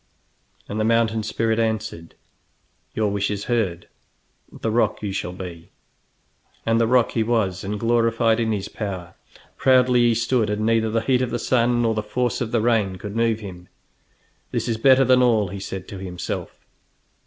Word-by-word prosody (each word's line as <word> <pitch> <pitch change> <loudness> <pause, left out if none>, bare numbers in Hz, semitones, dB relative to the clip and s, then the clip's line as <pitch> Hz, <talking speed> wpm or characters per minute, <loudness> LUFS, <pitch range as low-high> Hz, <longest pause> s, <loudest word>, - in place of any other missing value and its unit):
And 105 - -4
the - - +1
mountain 115 -1 +2
spirit 110 +1 -1
answered: 110 -7 -3 0.8
"Your 105 -2 +1
wish 100 0 -1
is 100 -1 -3
heard; 100 -8 -1 0.6
the 110 - -3
rock 115 -1 +1
you 100 - -2
shall 95 -2 -3
be!" 90 -3 -9 1.0
And 115 0 +2
the 115 - +3
rock 125 0 +3
he 115 - 0
was, 110 -5 0
and 105 +1 -3
glorified 115 0 +2
in 115 -1 0
his 100 -2 -2
power. 95 -5 -6 0.4
Proudly 125 -1 +4
he 120 -1 +3
stood, 115 -1 +1
and 105 +1 -1
neither 115 0 +2
the 115 +1 0
heat 125 +2 +1
of 125 - -1
the 120 - -2
sun 120 0 +1
nor 115 -1 +2
the 110 - -1
force 120 +3 -2
of 115 -2 -2
the 115 - +1
rain 110 -5 +1
could 100 +2 -7
move 115 -1 +1
him. 90 -3 -9 0.8
"This - - -2
is 115 -2 -1
better 135 +3 +5
than 130 0 +5
all!" 110 -6 +3
he 100 +2 -6
said 95 -1 -6
to 100 - -7
himself. 90 -2 -6
110 Hz, 180 wpm, -22 LUFS, 100-115 Hz, 1.0 s, better